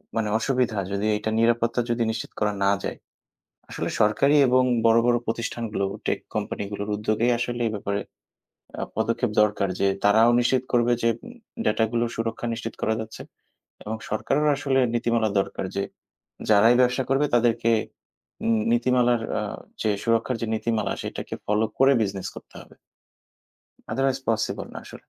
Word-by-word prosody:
মানে 110 -2 0
অসুবিধা 125 -3 0
যদি 100 +2 -1
এটা 110 +1 -3
নিরাপত্তা 115 +1 +2
যদি 120 0 +1
নিশ্চিত 110 - -5
করা 105 -1 +1
না 100 - +4
যায়। - - -4 0.7
আসলে - - -3
সরকারি 135 +8 +3
এবং 130 +1 +4 0.2
বড়, 115 0 +6
বড় 120 0 +4
প্রতিষ্ঠানগুলো 115 -3 -2 0.2
tech - - 0
কোম্পানিগুলোর 100 +1 -4
উদ্যোগেই 110 +3 +1
আসলে 120 0 -3
এই - - -2
ব্যাপারে 100 0 -2 0.8
আ - - -3
পদক্ষেপ 115 +1 0
দরকার, 105 -2 +1
যে 100 - +3 0.2
তারাও 110 +3 +6
নিশ্চিত 125 +1 +2
করবে 120 0 +3
যে 115 - +3 0.2
উম 240 - -10 0.3
উ - - -4
ডাটাগুলো 115 +1 +1
সুরক্ষা 115 +1 -3
নিশ্চিত 115 0 -6
করা 110 - +1
যাচ্ছে 110 0 -8 0.6
এবং 110 +2 -3
সরকারেরও 145 +7 +1
আসলে 135 -2 0 0.2
নীতিমালা 115 -2 +1
দরকার 95 - -2
যে 100 - +1 0.7
যারাই 110 +3 +6
ব্যবসা 125 +1 +3
করবে, 140 +2 +3
তাদেরকে 115 -1 +2 0.7
নী 115 - +2 0.2
নীতিমালার 120 -1 +3 0.2
আ - - -2 0.4
যে 110 - +1
সুরক্ষার 115 +2 +1
যে - - 0
নীতিমালা 110 -1 -1
সেটাকে - - -5
ফলো 105 +2 +2
করে 135 +1 +6
বিজনেস 95 -2 -3
করতে - - -12
হবে। - - -19 1.2
Otherwise 135 +2 +1
পসিবল 110 0 -1
না - - -8
আসলে। - - -12
115 Hz, 155 wpm, -25 LUFS, 110-120 Hz, 1.2 s, বড়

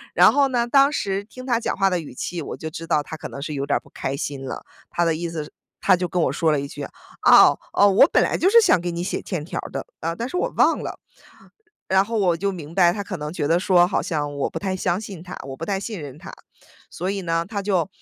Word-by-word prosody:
然 - - +7
后 285 -1 +4
呢， 240 -2 0
当 275 +3 +5
时 200 -6 -2
听 255 +4 -11
他 240 -3 +1
讲 - - -3
话 195 -1 +3
的 180 -1 0
语 150 -6 -9
气， 170 +4 -4
我 - - -6
就 160 - -5
知 165 +1 -8
道 150 -3 +2
他 160 - -7
可 - - -7
能 140 - -8
是 150 0 -4
有 140 0 -2
点 140 - +1
儿 - - -4
不 - - -21
开 135 +1 -4
心 140 -2 -4
了。 - - -6 0.2
他 175 - 0
的 165 -1 +2
意 170 +1 -3
思 160 -2 -4
是 - - -15 0.3
他 190 -2 +4
就 180 0 -2
跟 180 - 0
我 - - +1
说 160 -2 +1
了 145 - +1
一 140 - -4
句： - - -8 0.5
“哦 - - +7
哦， 205 - +5
我 195 - +6
本 - - +4
来 - - 0
就 375 - +3
是 465 +2 +7
想 185 - +4
给 175 0 -3
你 170 +1 -3
写 195 - -3
欠 165 -6 -4
条 - - -4
儿 - - -6
的， - - -4 0.2
啊， 165 +1 -2
但 235 +5 -3
是 360 - -7
我 - - 0
忘 - - +4
了”。 - - -6 0.9
然 190 0 +4
后 225 0 -2
我 180 -4 +2
就 200 +3 -1
明 165 -3 -8
白， 175 0 +5
他 205 +2 -4
可 185 -2 -5
能 150 0 -5
觉 145 -4 -2
得 170 +3 +3
说 180 -2 +4
好 190 - 0
像 145 -4 -2
我 140 - -1
不 - - -6
太 190 -2 -2
相 185 0 0
信 195 -6 -8
他， 185 +1 -8
我 135 -1 -7
不 160 - -9
太 195 -1 -1
信 200 -4 -6
任 140 -3 -8
他。 - - -10 0.6
所 185 +3 -3
以 200 -1 -3
呢， 165 -1 -1
他 205 -1 -3
就 190 -4 0
175 Hz, 305 characters per minute, -23 LUFS, 160-200 Hz, 0.9 s, 然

